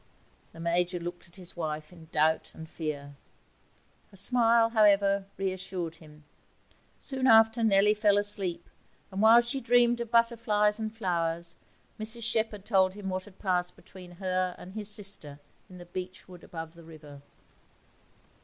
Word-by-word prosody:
The -, -, -14 dB
Major 175 Hz, +2 st, 0 dB
looked 175 Hz, +1 st, -7 dB
at 170 Hz, -, -21 dB
his 180 Hz, -3 st, -13 dB
wife 155 Hz, -1 st, -5 dB
in 165 Hz, -2 st, -15 dB
doubt 160 Hz, +1 st, +1 dB
and 160 Hz, -, -9 dB
fear; 145 Hz, -3 st, -6 dB, 0.9 s
her 195 Hz, -, -15 dB
smile, 230 Hz, +2 st, +4 dB
however, 200 Hz, -3 st, +3 dB
reassured 185 Hz, -3 st, -4 dB
him. 150 Hz, -2 st, -16 dB, 0.7 s
Soon 265 Hz, -1 st, -1 dB
after, 225 Hz, 0 st, +5 dB
Nellie 210 Hz, -1 st, +4 dB
fell 210 Hz, -1 st, +3 dB
asleep, 195 Hz, -4 st, 0 dB, 0.4 s
and 190 Hz, +1 st, -3 dB
while 225 Hz, +2 st, +7 dB
she 265 Hz, +3 st, -3 dB
dreamed 240 Hz, 0 st, +3 dB
of 235 Hz, -, -5 dB
butterflies 230 Hz, -3 st, +2 dB
and 220 Hz, -1 st, -3 dB
flowers 170 Hz, -5 st, -2 dB, 0.4 s
Mrs 220 Hz, +2 st, -2 dB
Shepherd 220 Hz, -3 st, -1 dB
told 190 Hz, -3 st, +2 dB
him 200 Hz, -2 st, -5 dB
what 185 Hz, 0 st, -3 dB
had 205 Hz, -2 st, -16 dB
passed 180 Hz, -3 st, -1 dB
between 180 Hz, -2 st, -14 dB
her 185 Hz, 0 st, -2 dB
and 185 Hz, -, -11 dB
his 210 Hz, -1 st, -5 dB
sister 195 Hz, -9 st, -3 dB, 0.3 s
in 185 Hz, -, -12 dB
the 175 Hz, -, -11 dB
beechwood 180 Hz, 0 st, -8 dB
above 160 Hz, -1 st, -8 dB
the 170 Hz, 0 st, -15 dB
river. 150 Hz, -3 st, -13 dB
190 Hz, 150 wpm, -29 LUFS, 170-215 Hz, 0.9 s, while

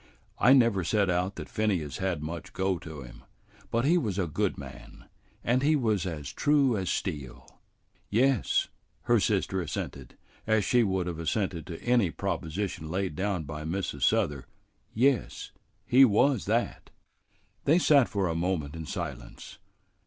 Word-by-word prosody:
"I 130 Hz, -, +6 dB
never 115 Hz, -8 st, +4 dB
set 100 Hz, +1 st, +1 dB
out 90 Hz, +2 st, -1 dB
that -, -, -7 dB
Phineas 95 Hz, -10 st, -1 dB
had 95 Hz, -6 st, -2 dB
much 80 Hz, +2 st, -6 dB
go 95 Hz, -2 st, 0 dB
to 80 Hz, -5 st, -9 dB
him, -, -, -13 dB, 0.5 s
but 115 Hz, +2 st, 0 dB
he 175 Hz, +4 st, +4 dB
was 105 Hz, -, -2 dB
a 95 Hz, -, +1 dB
good 80 Hz, -, -1 dB
man, 65 Hz, -2 st, -11 dB, 0.4 s
and 125 Hz, +2 st, +2 dB
he 155 Hz, +3 st, +3 dB
was 110 Hz, -, 0 dB
as 75 Hz, -5 st, -5 dB
true 140 Hz, -, +3 dB
as 95 Hz, -3 st, -2 dB
steel." 75 Hz, -11 st, -4 dB, 0.6 s
"Yes," 125 Hz, +2 st, +2 dB, 0.4 s
her 120 Hz, -1 st, +3 dB
sister 95 Hz, -3 st, 0 dB
assented, 70 Hz, -5 st, -6 dB, 0.3 s
as 110 Hz, -3 st, +2 dB
she 120 Hz, +4 st, +3 dB
would 95 Hz, -4 st, 0 dB
have 85 Hz, -2 st, -4 dB
assented 85 Hz, -1 st, -2 dB
to 85 Hz, -2 st, -7 dB
any 120 Hz, -6 st, +3 dB
proposition 85 Hz, -1 st, -3 dB
laid 95 Hz, -2 st, -2 dB
down 95 Hz, -1 st, -1 dB
by 75 Hz, +1 st, -6 dB
Mrs. 80 Hz, -3 st, -3 dB
Souther, 75 Hz, -, +1 dB, 0.4 s
"yes, 130 Hz, 0 st, 0 dB, 0.3 s
he 130 Hz, +2 st, +6 dB
was 130 Hz, +1 st, +3 dB
that." 115 Hz, +4 st, -1 dB, 0.8 s
They 155 Hz, +4 st, +5 dB
sat 145 Hz, -7 st, +4 dB
for 100 Hz, -3 st, 0 dB
a 85 Hz, -, -1 dB
moment 80 Hz, -3 st, -2 dB
in 80 Hz, -2 st, -7 dB
silence. -, -, -7 dB
95 Hz, 155 wpm, -28 LUFS, 80-115 Hz, 0.8 s, I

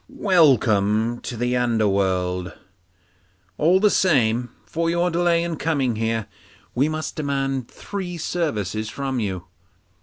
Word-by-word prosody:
Welcome 120 Hz, -, +3 dB
to 120 Hz, -, -6 dB
the 125 Hz, +2 st, 0 dB
underworld! 95 Hz, -6 st, 0 dB, 1.1 s
All 175 Hz, +5 st, +4 dB
the 210 Hz, 0 st, +4 dB
same, 120 Hz, -8 st, +2 dB, 0.2 s
for 165 Hz, 0 st, -1 dB
your 170 Hz, +1 st, +1 dB
delay 170 Hz, 0 st, +2 dB
in 170 Hz, -2 st, -3 dB
coming 140 Hz, -8 st, 0 dB
here, 115 Hz, -1 st, -1 dB, 0.5 s
we 140 Hz, +5 st, +2 dB
must 155 Hz, 0 st, -4 dB
demand 135 Hz, -4 st, -2 dB
three 185 Hz, -3 st, -6 dB
services 110 Hz, -, -2 dB
from 135 Hz, +1 st, -3 dB
you. 95 Hz, -5 st, -3 dB
130 Hz, 120 wpm, -22 LUFS, 110-165 Hz, 1.1 s, All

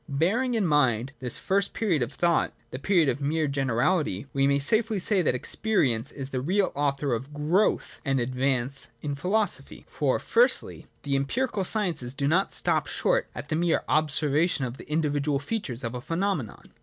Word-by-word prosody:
Bearing 210 Hz, -, +1 dB
in 215 Hz, -4 st, +1 dB
mind 130 Hz, -5 st, +2 dB
this 125 Hz, -2 st, -3 dB
first 200 Hz, +1 st, 0 dB
period 180 Hz, -, 0 dB
of 120 Hz, +2 st, -1 dB
thought, 170 Hz, +3 st, +1 dB, 0.2 s
the 130 Hz, -, -5 dB
period 170 Hz, -1 st, +3 dB
of 135 Hz, +2 st, -1 dB
mere 155 Hz, +2 st, 0 dB
generality, 135 Hz, -, 0 dB
we 135 Hz, 0 st, +2 dB
may 140 Hz, 0 st, +3 dB
safely 220 Hz, -, +2 dB
say 195 Hz, +1 st, +2 dB
that 150 Hz, -, +1 dB
experience 130 Hz, -, 0 dB
is 135 Hz, -1 st, -5 dB
the 130 Hz, -, -2 dB
real 185 Hz, +7 st, +1 dB
author 140 Hz, -1 st, 0 dB
oi 115 Hz, -, 0 dB
growth 150 Hz, -, 0 dB
and 135 Hz, -2 st, +1 dB
advance 130 Hz, +1 st, 0 dB, 0.2 s
in 145 Hz, -1 st, -2 dB
philosophy. 190 Hz, +7 st, -1 dB
For, -, -, 0 dB
firstly, 485 Hz, +2 st, +1 dB, 0.2 s
the 140 Hz, -1 st, 0 dB
empirical 205 Hz, -, -1 dB
sciences 170 Hz, -, -2 dB
do 140 Hz, 0 st, 0 dB
not 180 Hz, +6 st, +2 dB
stop -, -, 0 dB
short -, -, +1 dB
at -, -, -7 dB
the 155 Hz, -, 0 dB
mere 170 Hz, +1 st, +1 dB
observation 150 Hz, 0 st, +2 dB
of 125 Hz, +1 st, -6 dB
the -, -, -12 dB
individual 145 Hz, -2 st, +1 dB
features 140 Hz, -, -3 dB
of 115 Hz, 0 st, -3 dB
a 125 Hz, -, -5 dB
phenomenon. 165 Hz, -, -3 dB
145 Hz, 175 wpm, -26 LUFS, 135-185 Hz, 0.2 s, period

